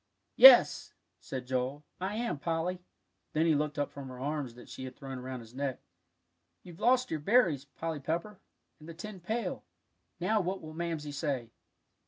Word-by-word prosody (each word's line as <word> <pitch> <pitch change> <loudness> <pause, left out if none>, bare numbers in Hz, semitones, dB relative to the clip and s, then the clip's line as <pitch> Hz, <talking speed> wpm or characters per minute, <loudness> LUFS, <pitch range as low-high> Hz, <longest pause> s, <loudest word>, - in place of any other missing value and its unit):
"Yes," - - +8 0.2
said 130 -2 -6
Joel, 130 +3 -2 0.2
"I 190 +3 -2
am, 230 -10 -2
Polly;" 170 +3 -2 0.5
then 155 +1 +2
he 165 - +4
looked 150 0 -1
up 145 - -1
from 140 -1 -8
her 130 -1 -9
arms 140 -3 -3
that 120 - -13
she 130 - -7
had 130 -1 -8
thrown 135 -1 -7
around 130 0 -6
his 115 0 -14
neck. 135 -1 -3 0.8
"You've 175 0 -12
lost 250 +2 +3
your 160 - -1
berries, 165 - +3
Polly 160 +3 -5
Pepper, 170 +8 -3 0.4
and 155 +2 -12
the 165 - -8
tin 195 +3 -8
pail. 220 +7 -3 0.6
Now 210 +4 +2
what 190 +1 -2
will 155 0 -9
Mamsie 160 -3 -3
say?" 140 -5 -3
155 Hz, 175 wpm, -31 LUFS, 135-180 Hz, 0.8 s, Yes